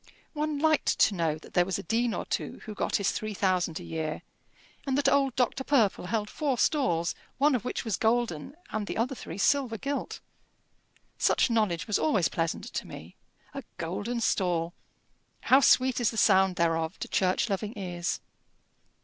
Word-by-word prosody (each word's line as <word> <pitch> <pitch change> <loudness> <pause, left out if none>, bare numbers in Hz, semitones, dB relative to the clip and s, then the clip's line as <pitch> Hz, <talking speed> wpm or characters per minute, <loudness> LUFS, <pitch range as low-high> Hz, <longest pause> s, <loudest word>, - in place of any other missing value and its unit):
One 300 -1 -2
liked 310 0 +2
to 215 - +4
know 165 -4 0
that 160 - -16
there 180 - +4
was 185 0 -2
a - - -6
dean 230 +5 0
or - - -4
two - - -4
who 215 - -6
got - - -1
his 200 -1 +2
three 215 -1 -4
thousand 180 -4 0
a - - -9
year, 160 -1 -4 0.6
and 265 0 +1
that 285 - +2
old 275 -3 +3
Dr. 255 +1 0
Purple 225 -10 +2
held 210 0 -1
four 275 +2 -1
stalls, 180 - +1 0.2
one 290 +2 +4
of 250 - 0
which 250 - -3
was 220 - -1
golden, 230 - 0 0.2
and 215 -2 -3
the - - -4
other 240 +4 0
three 175 -8 -8
silver 250 +1 +2
gilt! 280 +5 -4 1.0
Such - - +3
knowledge 210 -7 +1
was 210 - 0
always 210 - +2
pleasant 165 +3 -2
to - - -4
me! - - -10 0.4
A 275 - -5 0.2
golden 205 +8 -3
stall! 175 -6 0 0.7
How 265 - +5
sweet 260 -2 +4
is 240 - +2
the 225 - -6
sound 190 -3 +4
thereof 165 0 0
to - - -5
church 185 +4 +1
loving 210 +2 -3
ears! 175 -3 -3
215 Hz, 180 wpm, -28 LUFS, 180-255 Hz, 1.0 s, How